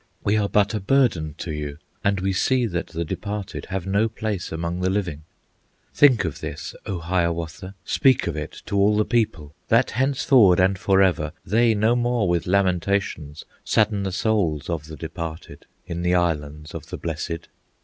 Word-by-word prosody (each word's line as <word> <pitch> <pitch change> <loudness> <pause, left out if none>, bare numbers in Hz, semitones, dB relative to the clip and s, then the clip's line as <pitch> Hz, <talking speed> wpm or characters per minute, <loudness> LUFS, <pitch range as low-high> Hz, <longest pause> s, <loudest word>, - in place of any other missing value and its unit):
We 100 - +2
are 105 -2 +1
but 105 +1 +2
a 105 - -1
burden 95 - +1
to 85 -1 -5
you, 75 -1 -5 0.3
And 100 -1 +1
we 95 0 0
see 125 +6 +2
that 90 -5 -3
the 85 +1 -4
departed 105 +4 -5
Have 95 -2 -3
no 100 +4 +1
place 110 -4 -4
among 85 +2 -3
the 95 - +1
living. 90 -6 -2 0.7
"Think 125 -9 +5
of 80 - -4
this, - - -6
O 95 - -2
Hiawatha! 85 +1 -2
Speak 130 -2 +3
of 85 - -2
it 75 -1 -6
to - - -4
all 105 +2 +4
the 105 - +2
people, 80 -11 -1
That - - +3
henceforward 130 -6 +4
and 95 0 +3
forever 95 -6 +2
They 115 +3 +3
no 110 +3 +3
more 120 -3 +1
with 85 -1 0
lamentations 90 -5 0 0.2
Sadden 105 -2 +2
the 95 -1 -2
souls 90 -7 0
of 75 -2 -3
the 80 -1 -9
departed 80 -1 -7 0.2
In 85 0 -4
the 90 +1 +2
Islands 75 -3 -1
of - - -7
the - - -5
Blessed. 85 0 -4
95 Hz, 175 wpm, -23 LUFS, 85-105 Hz, 0.7 s, Think